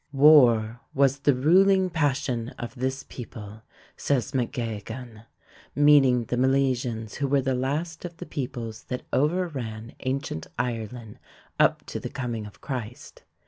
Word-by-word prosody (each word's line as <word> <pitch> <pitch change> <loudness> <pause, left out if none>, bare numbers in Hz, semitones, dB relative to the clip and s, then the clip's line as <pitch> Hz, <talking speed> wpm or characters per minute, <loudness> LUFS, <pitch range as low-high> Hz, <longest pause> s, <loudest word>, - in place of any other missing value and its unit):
"War 120 -6 +6 0.2
was 140 0 +3
the 145 -1 +3
ruling 185 +7 +4
passion 135 -6 0
of 120 - -6
this 130 +1 -3
people," 110 -3 -9 0.3
says 130 -7 0
MacGeoghegan, 115 -2 -4 0.5
meaning 140 -4 +5
the 120 - -2
Milesians 125 -4 0
who 140 - 0
were 135 0 +2
the 130 0 0
latest 150 +6 -2
of 175 -1 -7
the - - -7
peoples 120 -5 -5
that 125 - -5
overran 135 -8 -1
ancient 130 - -3
Ireland 115 -2 -4 0.4
up - - +3
to - - -5
the - - -5
coming 120 -5 -4
of 105 - -16
Christ. 125 -4 -7
130 Hz, 135 wpm, -26 LUFS, 115-140 Hz, 0.5 s, War